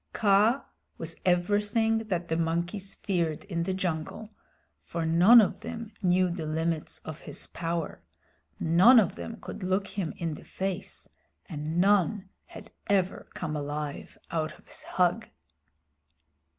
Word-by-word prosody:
Kaa 215 +5 +3 0.3
was 165 0 -4
everything 205 +5 +2
that 180 -4 -2
the 160 - 0
monkeys 170 +4 -2
feared 170 -5 -1
in 175 -5 -3
the 185 +3 -1
jungle, 185 +4 -3 0.5
for 165 -1 -4
none 175 +9 +8
of 210 - +2
them 230 -1 -7
knew 180 -1 +3
the 170 -3 -4
limits 160 0 -2
of 155 0 -7
his - - -7
power, 165 -1 -4 0.6
none 185 +10 +7
of 195 -6 +2
them 230 - -7
could - - -8
look 190 +2 0
him 195 -5 -3
in 165 -2 -2
the - - -10
face, 190 0 -4 0.4
and 155 -1 -4
none 195 +1 +3 0.2
had - - -12 0.2
ever 195 -2 0
come 150 - -3
alive 145 0 -5
out 160 -2 -2
of - - -23
his - - -10
hug. 180 +5 0
180 Hz, 140 wpm, -28 LUFS, 165-205 Hz, 0.6 s, none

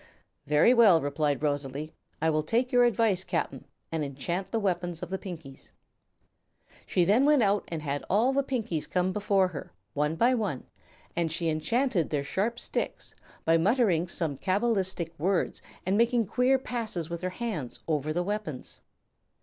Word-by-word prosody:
"Very 150 - +5
well," 215 -9 +7
replied 145 -1 -1
Rosalie; 145 +1 -2 0.3
"I 160 +1 +2
will 155 0 +1
take 235 - 0
your 245 -1 +5
advice, 220 -5 +2
Cap'n, 165 -7 -3 0.3
and 160 -2 -1
enchant 145 +7 -3
the 230 - -1
weapons 175 -4 -2
of 180 - -6
the 190 - -2
Pinkies." 160 -8 -9 1.1
She 180 - +2
then 210 +8 +4
went 290 -3 +5
out 200 0 +2
and 160 -3 -5
had 145 -1 -2
all 230 +7 +3
the 275 - +3
Pinkies 225 - -3
come 180 0 +1
before 200 -2 +2
her, 155 -5 -8 0.2
one 150 +2 0
by 240 +9 +3
one, 205 - -2 0.5
and 170 -2 0
she 165 +1 0
enchanted 180 - +1
their 145 -2 -1
sharp 210 +11 -1
sticks - - -4 0.3
by 165 0 +5
muttering 185 -2 +2
some 160 -5 -2
cabalistic 190 - 0
words 185 +3 0 0.2
and 195 +3 +2
making 235 0 +3
queer 255 +6 +3
passes 225 - -3
with 170 0 -5
her 185 - -1
hands 185 - -4
over 155 -1 0
the 175 +3 0
weapons. 200 -8 -5
180 Hz, 165 wpm, -28 LUFS, 155-225 Hz, 1.1 s, well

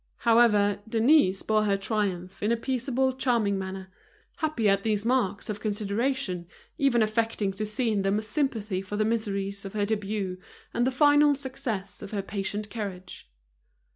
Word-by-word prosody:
However, 210 -4 +4
Denise 225 -4 +4
bore 215 -1 +2
her 200 -1 +2
triumph 195 -3 -2
in 210 - +1
a 235 - +2
peaceable, 260 +1 0
charming 235 -7 +1
manner, 190 0 -6 0.5
happy 310 -9 0
at 195 0 +3
these 210 0 -1
marks 235 -5 0
of 210 -2 -4
consideration, 205 -3 -1 0.3
even 245 -5 +4
affecting 215 -2 0
to 210 +2 -4
see 225 +2 0
in 205 -2 +1
them 195 +1 +1
a 215 - -2
sympathy 215 -5 -1
for 205 +2 -5
the 215 - +2
miseries 200 -3 -1
of 195 - -7
her 205 -1 0
debut 205 -3 -2 0.3
and 240 +1 +1
the - - +1
final 290 +1 +5
success 255 -8 -4
of - - -7
her 200 -2 -1
patient 205 +1 -4
courage. 190 - -7
215 Hz, 165 wpm, -27 LUFS, 195-235 Hz, 0.5 s, final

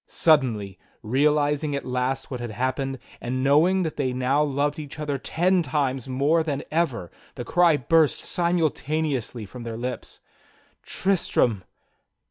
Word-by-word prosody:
Suddenly, 115 - +1 0.2
realizing 145 +4 +1
at 140 - -4
last 125 +2 -2
what 125 - -4
had 120 -1 -5
happened, 130 +4 -2 0.2
and 130 +2 -2
knowing 165 +7 +4
that 160 - -4
they 130 -3 0
now 130 +3 +1
loved 145 +1 0
each 145 -1 -8
other 145 -3 -3
ten 180 +6 +1
times 135 -3 -1
more 140 +6 +2
than 145 -3 -3
ever, 135 - -1 0.2
the 120 - -6
cry 170 +2 +4
burst 155 +3 +2
simultaneously 155 -8 -1
from 125 +5 -10
their 115 -1 -5
lips: 125 +2 -6 0.6
"Tristram!" 125 - 0
140 Hz, 135 wpm, -24 LUFS, 125-155 Hz, 0.6 s, knowing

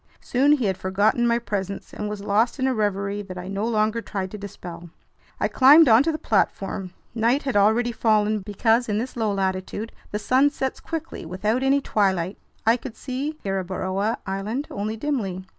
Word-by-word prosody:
Soon 275 +4 +3
he 265 -6 +1
had 190 -2 -1
forgotten 205 +5 +2
my 235 0 +3
presence 200 -4 -4
and 210 - -4
was 210 -1 -5
lost 215 +6 +1
in 260 - 0
a 265 - +2
reverie 205 -2 -1
that 185 -2 -8
I 180 0 -6
no 195 +3 -2
longer 220 0 +1
tried 190 -4 -4
to 210 - -6
dispel. 175 -4 -9 0.5
I - - +2
climbed 290 +4 +7
onto 245 +7 +5
the 310 - -3
platform. 195 -5 -1 0.2
Night 235 +4 +1
had 270 -4 -2
already 220 +4 +3
fallen, 215 -2 +2
because 225 +4 +1
in 210 - 0
this 245 +4 -3
low 220 -3 0
latitude 195 +3 -2 0.2
the 210 - -2
sun 260 +6 +3
sets 265 -2 -3
quickly, 325 0 -6
without 210 +8 -1
any 275 +1 +3
twilight. 190 -6 0 0.3
I 225 +2 +5
could 245 -1 -9
see 280 +4 -4
Gueboroa 190 +2 -1
Island 205 +8 -3
only 215 +2 -3
dimly. 210 -9 -2
215 Hz, 180 wpm, -24 LUFS, 195-245 Hz, 0.5 s, climbed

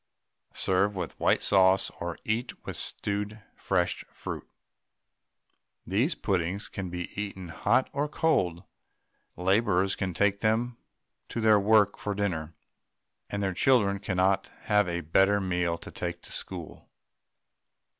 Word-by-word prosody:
Serve 100 +2 +2
with 90 -4 -5
white - - +3
sauce 95 -1 +4
or 85 -1 -4
eat 115 +2 -2
with - - -5
stewed 105 +1 -3
fresh - - 0
fruit. - - -7 1.4
These 115 - +1
puddings 95 +1 -1
can 95 -3 -5
be 90 0 -5
eaten 95 -4 -6
hot 105 - +2
or 145 +1 0
cold; 95 - +1 0.7
labourers 95 0 +2
can 95 -3 -3
take 100 +2 +2
them 115 +3 +1 0.5
to - - -3
their 110 -2 +5
work 105 0 +4
for 105 -1 -3
dinner, 85 -6 -2 0.7
and 100 0 -2
their 95 -1 0
children 100 -2 +3
cannot 95 -1 +1
have 105 -3 +2
a 85 0 -2
better 95 +6 +3
meal 90 -3 0
to - - -10
take 85 -1 -5
to - - -11
school. - - -6
100 Hz, 130 wpm, -28 LUFS, 90-105 Hz, 1.4 s, their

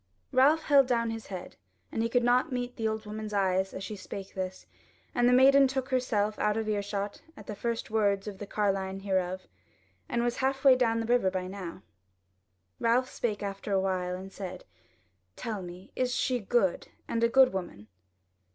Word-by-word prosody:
Ralph 285 +5 +4
held 280 -3 +5
down 230 -2 +1
his 225 -1 -6
head, 185 -3 -7 0.3
and - - -1
he 230 - 0
could 245 +1 +2
not 250 +5 +3
meet 245 -1 -3
the 225 -2 -1
old 220 0 -3
woman's 215 0 -6
eyes 190 -1 +1
as 190 - -6
she 210 +2 -5
spake 195 0 -8
thus; 185 0 -5 0.5
and 245 0 +3
the - - +4
maiden 270 +2 +7
took 265 0 -3
herself 215 -5 0
out 210 0 +1
of 220 -1 -2
earshot 205 -1 -2 0.2
at 210 - -11
the 215 - -5
first 230 +2 -3
words 205 -2 +1
of 200 -2 -6
the 205 - -6
carline 195 -2 -1
hereof, 185 -1 -1 0.6
and 235 - 0
was 240 0 0
halfway 265 0 +4
down 230 -3 +2
to 225 - -2
the 240 - +2
river 240 -6 +3
by 185 -1 -3
now. 185 -1 -7 1.0
Ralph 245 +3 +2
spake 210 -4 -2
after 200 +1 -5
a 195 - +3
while 185 -1 -1
and 190 +1 -8
said: 185 -2 -7 0.7
"Tell 215 -4 -4
me, 180 +1 -10
is 250 0 0
she 250 -1 +1
good, 205 -3 +1 0.2
and 230 0 -1
a 230 - +4
good 260 -1 +5
woman?" 175 - -5
215 Hz, 190 wpm, -29 LUFS, 195-245 Hz, 1.0 s, maiden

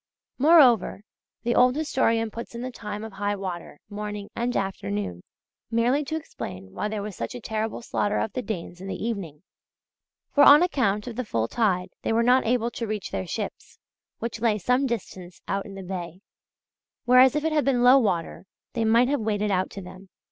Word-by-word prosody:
Moreover, 260 - +5 0.4
the 240 - +1
old 250 +1 +4
historian 230 -7 +1
puts 235 +1 -8
in 235 - -5
the 255 - -4
time 210 -2 -6
of 220 -2 -8
high 205 +1 -1
water, 180 -6 -6
morning 210 -1 -6
and 245 +1 -1
afternoon, 100 - -3 0.5
merely 240 +5 +2
to 315 - -3
explain 95 - -7
why 210 - -2
there 210 -1 -3
was 210 -2 -6
such 115 -4 -5
terrible 220 +1 -3
slaughter 205 -2 -1
of 215 - -2
the 255 - -2
Danes 180 -6 -6
in 190 - -7
the - - -3
evening; 195 -9 -5 0.9
for 285 - +6
on 295 +4 +9
account 210 - 0
of 240 -2 -7
the 255 - -1
full 115 - -1
tide 185 - 0
they - - -1
were 230 +1 +3
not 250 0 +4
able 240 0 +1
to 230 - -4
reach 210 -2 -4
their 95 -2 -3
ships, - - -6 0.4
which 230 0 -5
lay 225 -3 +2
some 250 +7 +1
distance 185 -6 -6
out 195 +2 -2
in 195 - -10
the 195 - -7
bay, 180 -1 -6 0.8
whereas 255 +2 +6
if 300 - 0
it 320 - +1
had 300 -2 +2
been 250 -3 +2
low 255 +2 +8
water 185 -7 -1 0.3
they 230 - 0
might 230 +3 +4
have 285 -2 0
waded 210 -1 0
out 185 -1 +1
to 195 - -8
them. 185 +1 -12
220 Hz, 195 wpm, -25 LUFS, 195-245 Hz, 0.9 s, on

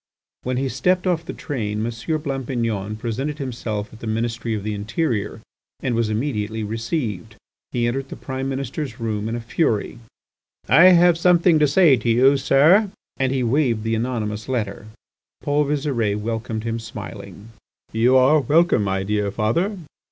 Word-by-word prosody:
When 125 0 -2
he 135 +1 0
stepped 175 +10 0
off 175 -3 +1
the - - -3
train 110 - -3
M. 120 - -2 0.3
Blampignon 115 -7 -2
presented 130 +6 -3
himself 115 -7 -4
at 110 - -12
the 115 - -7
Ministry 115 +1 -2
of 105 - -5
the 105 0 -2
Interior, 105 0 -2 0.4
and 130 - -2
was 115 -1 0
immediately 110 -2 -2
received. 110 - -3 0.4
He 120 -1 0
entered 135 +3 -2
the - - -7
Prime 130 0 -4
Minister's 135 -1 -4
room 110 -1 -2
in 115 - -2
a - - -3
fury. 115 -2 -1 0.7
"I 160 +9 +7
have 175 -2 +6
something 175 -2 +4
to 150 - +4
say 145 -2 +5
to 115 +1 -2
you, 130 +4 +5
sir!" 160 +11 +4 0.3
And 130 -1 0
he 130 -2 0
waved 120 -3 +1
the 115 0 -1
anonymous 110 -2 -3
letter. 105 -4 -3 0.6
Paul 145 +1 +1
Visire 135 -8 0
welcomed 110 0 -3
him 115 0 -2
smiling. 105 -2 -9 0.4
"You 120 +4 +4
are 135 +4 +5
welcome, 155 -4 +3
my 95 -1 -1
dear 105 0 -1
father. 145 - 0
120 Hz, 160 wpm, -22 LUFS, 110-140 Hz, 0.7 s, I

